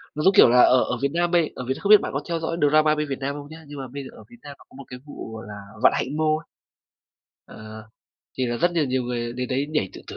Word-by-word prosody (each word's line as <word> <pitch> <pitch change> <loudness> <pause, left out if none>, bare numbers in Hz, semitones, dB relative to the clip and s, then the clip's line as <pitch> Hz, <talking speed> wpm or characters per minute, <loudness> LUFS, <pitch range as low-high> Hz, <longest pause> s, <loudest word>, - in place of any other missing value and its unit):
Nó 150 - -3
giống 190 - +5
kiểu - - +7
là 125 +1 +5
ở 125 0 +5
ở - - -3
Việt 140 - +1
Nam 175 0 0
bây 170 -3 +2
ở 125 - -6
Việt 130 - 0
N - - -11
không 200 - -3
biết 210 -1 +8
bạn - - -4
có 140 - -1
theo 170 -1 -1
dõi 165 +1 -3
drama 155 +1 +3
bên 150 0 -2
Việt 135 - -4
Nam 140 +1 -3
không 145 -1 -9
nhá. 160 +1 -12
Nhưng 145 0 -10
mà 135 - -6
bây 140 0 -6
giờ 130 - -10
ở - - -13
Việt 240 - -16
Nam 145 -1 -10
nó - - -17
có - - -23
một 140 - -9
cái 125 - -9
vụ 145 -6 -9
gọi 110 - -8
là 105 - -8 0.3
Vạn - - +6
Hạnh 145 +4 -3
Mall. 155 0 0 1.0
Ờ, 110 0 -11 0.6
thì 130 - 0
là 120 0 -2
rất 175 +9 +1
nhiều 165 -3 +1
nhiều 130 -1 -1
người 120 -1 -4
đến 125 0 -4
đấy 135 +2 -1
nhảy 150 -11 -1
tự - - -11
tử. - - -9
140 Hz, 315 wpm, -23 LUFS, 125-155 Hz, 1.0 s, biết